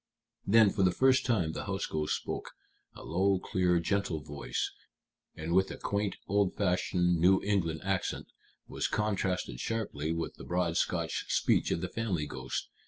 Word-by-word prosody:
Then, 110 0 +6
for 100 - -1
the 95 - +5
first 130 +7 +3
time, 95 -10 +1
the - - -5
house 95 -1 -2
ghost 75 -1 -1
spoke, - - -5 0.4
a - - -10
low, 95 +3 +2
clear, 90 -1 +1
gentle 95 -2 0
voice, 70 -5 -3 0.6
and 80 +2 -3
with 95 +1 +4
a - - -6
quaint, 100 0 -1
old 100 -1 +2
fashioned 90 -2 +1
New 95 +3 +5
England 85 -6 0
accent, 95 -1 -1 0.4
which - - -2
contrasted 95 - -1
sharply 80 - -2
with 80 0 -3
the - - -10
broad 90 -2 0
Scotch 85 -1 0
speech - - +2
of 85 - 0
the 90 - -2
family 90 -6 -2
ghost. - - -4
90 Hz, 165 wpm, -31 LUFS, 85-100 Hz, 0.6 s, Then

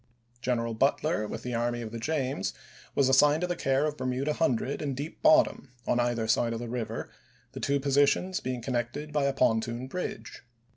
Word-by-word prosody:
General 115 -2 0
Butler, 135 -1 +1
with - - -6
the 125 - -4
Army 120 0 -1
of 110 - -6
the 115 - -5
James, 130 -6 -1 0.4
was 140 - +4
assigned 145 +4 +5
to - - +1
the 175 0 -2
care 135 -1 +1
of 150 -1 -2
Bermuda 130 +3 -1
Hundred 140 -3 0
and 140 -3 -2
Deep 150 +4 -6
Bottom 155 - +4 0.2
on 120 - +1
either 120 -2 0
side 115 +1 +2
of 115 - -3
the 120 - -5
river, 115 -1 -4 0.4
the - - -7
two 140 0 +1
positions 145 +7 +2
being 125 -2 -4
connected 130 +5 -3
by 145 -2 +2
a 140 - +1
pontoon 115 -1 +1
bridge. 180 +8 -5
130 Hz, 190 wpm, -29 LUFS, 120-145 Hz, 0.4 s, assigned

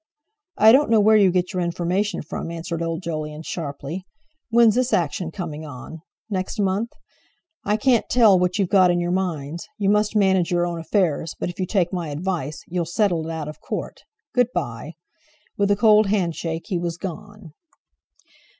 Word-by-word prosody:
"I 220 +1 +7
don't 275 +3 +4
know 225 -1 +5
where 215 +1 +5
you 200 -3 +6
get 180 0 0
your 185 - -1
information 175 +3 -1
from," 155 - -5
answered 170 0 -5
old 165 +1 -3
Jolyon 155 -1 -4
sharply. 155 +2 -5 0.5
"When's 230 -1 +5
this 250 +2 0
action 170 0 0
coming 160 -4 -6
on? 150 +2 -9 0.3
Next 195 +1 -3
month? 200 +3 0 0.8
I 210 - +2
can't 240 +1 +2
tell 220 -6 +5
what 180 +2 0
you've 195 -4 0
got 185 -3 +6
in 175 0 +2
your 175 0 -1
minds. 170 -4 -3
You 200 -1 +2
must 210 +1 +1
manage 190 -4 +3
your 175 -1 +1
own 170 -1 -3
affairs; 165 -2 0
but - - -2
if 175 - -18
you 185 - -1
take 180 -2 0
my 175 -4 -3
advice, 155 -1 -3
you'll 175 -1 -2
settle 175 -3 0
it - - -4
out 160 -2 -4
of 150 - -9
Court. - - -5 0.3
Good 245 -2 +3
bye!" 145 -1 -4 0.6
With 200 0 +1
a 205 - +4
cold 215 0 +5
handshake 170 -4 -1
he 180 -4 0
was 170 -1 -3
gone. 190 -1 -8
180 Hz, 180 wpm, -22 LUFS, 165-205 Hz, 0.8 s, I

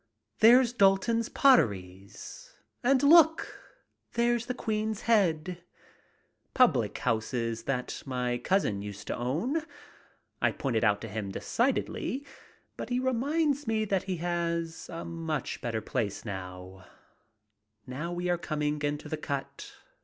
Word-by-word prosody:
There's 240 +2 +6
Dalton's 225 +2 +3
Potteries! 100 - +1 0.3
And 265 +2 +3
look, 320 +2 +5 0.5
there's 235 0 +1
the 250 - -2
Queen's 215 -1 -2
Head! 180 -6 +1 0.9
Public 130 - +3
house 115 -2 -1
that 120 +1 -3
my 125 -2 -1
cousin 125 - 0
used 100 0 -8
to - - -3
own. 170 - -1 0.8
I - - +2
point 135 -4 -2
it 110 - +1
out 105 -2 +3
to 115 - -5
him 105 -1 -4
decidedly, 260 - -1 0.5
but - - -6
he 245 0 0
reminds 280 +3 0
me 220 -1 +1
that 195 -2 -1
he 185 - -1
has 170 -1 -2
a 170 -1 -6
much 165 -4 -4
better 115 -3 -2
place 110 -3 -3
now. 95 -1 -8 1.0
Now 145 +7 -5
we 175 +1 -3
are 175 -1 +1
coming 150 -2 -2
into 145 +1 -2
the 155 - -3
cut. 140 -2 -5
170 Hz, 130 wpm, -29 LUFS, -, 1.0 s, There's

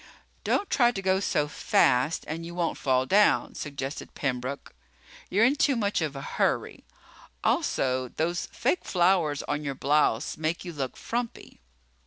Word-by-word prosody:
"Don't 405 - +1
try 240 -2 +5
to 200 - -5
go 190 0 +2
so 150 -6 0
fast 145 0 +2
and 160 +2 -4
you 170 +1 -8
won't 175 -2 -1
fall 130 -1 +2
down," 205 +8 +3
suggested 140 -1 -6
Pembroke. 130 0 -3 0.6
"You're 205 +5 +4
in 265 +4 +3
too 285 -1 +2
much 205 -5 0
of 150 -3 -2
a 135 - -5
hurry. - - -1 0.6
Also 130 -1 +1
those 170 +7 -2
fake 365 - -1
flowers 175 -5 +2
on 145 +1 -3
your 140 -2 -3
blouse 140 -2 +1
make 160 +3 -2
you 175 - -6
look 135 -4 -4
frumpy." 235 0 -5
155 Hz, 155 wpm, -27 LUFS, 140-190 Hz, 0.6 s, try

